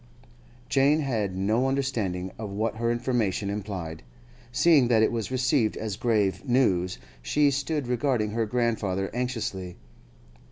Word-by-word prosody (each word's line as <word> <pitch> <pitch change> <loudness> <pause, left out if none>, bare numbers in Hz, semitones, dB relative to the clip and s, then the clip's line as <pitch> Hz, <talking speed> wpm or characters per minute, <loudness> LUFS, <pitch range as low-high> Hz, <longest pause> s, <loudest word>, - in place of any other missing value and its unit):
Jane 145 +3 +3
had 110 -9 -1
no 110 +7 +1
understanding 110 -10 -1
of 110 -2 -4
what 110 +2 -2
her 115 +1 0
information 115 -5 0
implied; 95 -6 -5 0.5
seeing 145 -2 +5
that 115 -2 +4
it - - +3
was 115 -3 -3
received 130 -2 +1
as 110 -3 -3
grave 105 -6 +1
news, 100 - +1 0.2
she 145 - +2
stood 140 +1 -1
regarding 120 -3 0
her 115 0 -1
grandfather 105 -5 -1
anxiously. 110 -8 -3
115 Hz, 130 wpm, -26 LUFS, 100-130 Hz, 0.5 s, seeing